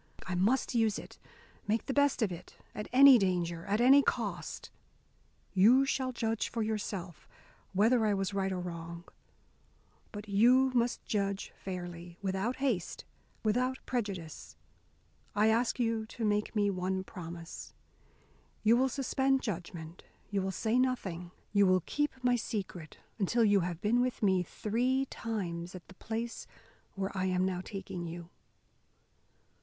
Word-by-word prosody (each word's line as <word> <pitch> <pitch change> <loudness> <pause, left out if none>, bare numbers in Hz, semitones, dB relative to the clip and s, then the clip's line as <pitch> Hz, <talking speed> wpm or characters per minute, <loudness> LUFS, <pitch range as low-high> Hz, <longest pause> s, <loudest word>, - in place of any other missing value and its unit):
I 185 - -3
must 210 +11 +2
use 225 -3 +2
it, - - -10 0.5
make 220 +2 0
the 270 - -2
best 285 -3 +3
of 200 - 0
it, 175 +1 -9 0.2
at 210 - -5
any 270 -1 +9
danger, 175 -3 -1
at 205 +2 +1
any 265 +4 +7
cost. - - -3 0.8
You 230 +8 +6
shall 265 -1 -1
judge 225 -2 -1
for 230 -1 -2
yourself 200 -5 -4 0.5
whether 225 +5 +4
I 210 -2 +2
was 195 0 -2
right 195 -1 0
or 185 - -2
wrong. 170 -1 -6 1.1
But 210 0 -8
you 245 +6 +5
must 240 -1 0
judge 200 -2 -2
fairly, 175 -2 -7
without 195 +5 -1
haste, 245 -11 -2 0.4
without 250 +4 +1
prejudice. 195 - -4 0.8
I 210 +1 +4
ask 235 +3 +1
you 225 -2 0
to 225 0 -4
make 210 +1 0
me 205 -1 +2
one 190 0 -2
promise. 170 -3 -9 0.9
You 225 +2 +5
will 265 +1 +3
suspend 270 0 +1
judgment, 170 -5 -6 0.3
you 200 -1 +1
will 190 - -1
say 220 +5 0
nothing, 190 -10 -1 0.2
you 200 -1 +5
will 185 0 +4
keep 295 0 0
my 245 0 +4
secret, 195 -8 -5 0.2
until 230 +4 +2
you 205 -1 +5
have 175 -1 -3
been 230 +3 +3
with 250 -3 -1
me 190 -2 +4
three 245 +9 0
times 180 -6 -4
at 180 - -10
the - - -12
place 225 +4 -5 0.5
where 195 0 -3
I 190 0 0
am 185 0 +1
now 185 -1 -1
taking 185 -3 -6
you." 170 +1 -8
205 Hz, 150 wpm, -31 LUFS, 185-235 Hz, 1.1 s, any